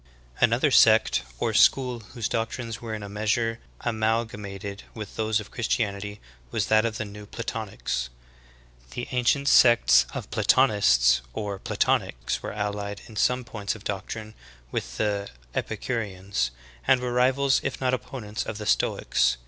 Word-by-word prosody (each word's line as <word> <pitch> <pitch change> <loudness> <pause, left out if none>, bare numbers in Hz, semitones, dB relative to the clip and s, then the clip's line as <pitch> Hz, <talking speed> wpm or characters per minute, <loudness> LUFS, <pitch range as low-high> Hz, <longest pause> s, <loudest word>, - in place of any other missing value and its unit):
,' - - -31 0.4
11. - - +1
Another - - +2
sect - - +5 0.2
or - - -1
school 125 -3 +4 0.2
whose 115 -3 -1
doctrines 115 -1 -3
were 115 -2 -4
in 105 - -7
a - - -6
measure 110 +3 0 0.2
amalgamated 110 -3 -2
with 105 -3 -7
those 110 0 +1
of 105 - -9
Christianity 105 -3 -2 0.3
v/as 110 - 0
that 110 +3 +4
of 115 -1 -2
the 110 - -3
New 105 0 -10
Platonics. 105 - -4 0.9
The 120 - -4
ancient 130 +3 +2
sects 120 - +6
of - - -6
Platonists 60 - +4
or 100 -2 -4
Platonics 60 -7 0
were - - -5
allied 100 0 -3
in 110 - -13
some 125 +4 +2
points 105 -2 -4
of 105 - -12
doctrine 110 +2 -5 0.4
with - - -4
the 100 -1 -1 0.2
Epicureans, 95 - -2 0.4
and 130 - +5
were 125 -1 -3
rivals 130 +2 +3
if 135 - -3
not 130 -1 +1
opponents 115 -4 -4
of 110 - -5
the 105 - -6
Stoics. - - +2
110 Hz, 150 wpm, -26 LUFS, 100-120 Hz, 0.9 s, sects